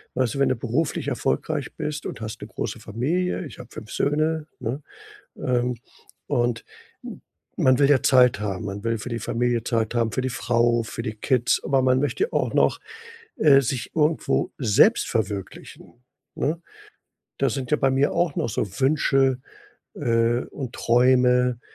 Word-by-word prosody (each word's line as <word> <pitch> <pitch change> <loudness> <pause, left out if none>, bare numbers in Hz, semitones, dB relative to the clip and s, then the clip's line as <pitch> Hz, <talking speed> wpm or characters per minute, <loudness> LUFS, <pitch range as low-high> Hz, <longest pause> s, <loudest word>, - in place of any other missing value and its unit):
Also, 130 +1 0
wenn 140 - +3
du 130 - +1
beruflich 125 +7 -2
erfolgreich - - -2
bist 150 0 -4
und - - -7
hast 110 +1 -6
'ne - - -7
große - - -5
Familie, 165 - -2
ich 145 - -11
habe 125 - -10
5 110 - -10
Söhne, 155 +1 0
ne, 125 +4 -4 0.6
ähm, 125 -1 0 0.5
und 120 -1 0 0.4
m - - -8 0.4
man 130 -1 +3
will 140 0 +4
ja 140 -3 +4
Zeit 125 -4 +5
haben. 100 -3 -3
Man 100 +1 -6
will 115 0 0
für 115 +4 -7
die 115 - -2
Familie 120 +1 -1
Zeit 115 -2 -1
haben, 115 -2 +1
für 130 - -1
die 130 - -2
Frau, 120 -1 +1
für 115 +1 -6
die 110 -2 -4
Kids. 125 +2 +1
Aber 135 -1 +2
man 130 0 +3
möchte 390 - -1
auch - - 0
noch, - - +2 0.6
äh, 140 -3 +6
sich 125 -2 -4
irgendwo 155 0 +1
selbst 110 -7 +4
verwirklichen, 105 +3 -5 0.3
ne? 160 +4 -1 0.8
Da 135 - +2
sind 130 -3 -4
ja - - +5
bei 135 -2 +2
mir 135 +2 +2
auch 170 -3 0
noch - - -1
so 105 - -2
Wünsche, 135 -2 +2 0.6
äh, 115 +1 +1
und 130 -4 -7
Träume, 125 0 +3
125 Hz, 165 wpm, -24 LUFS, 115-140 Hz, 0.8 s, äh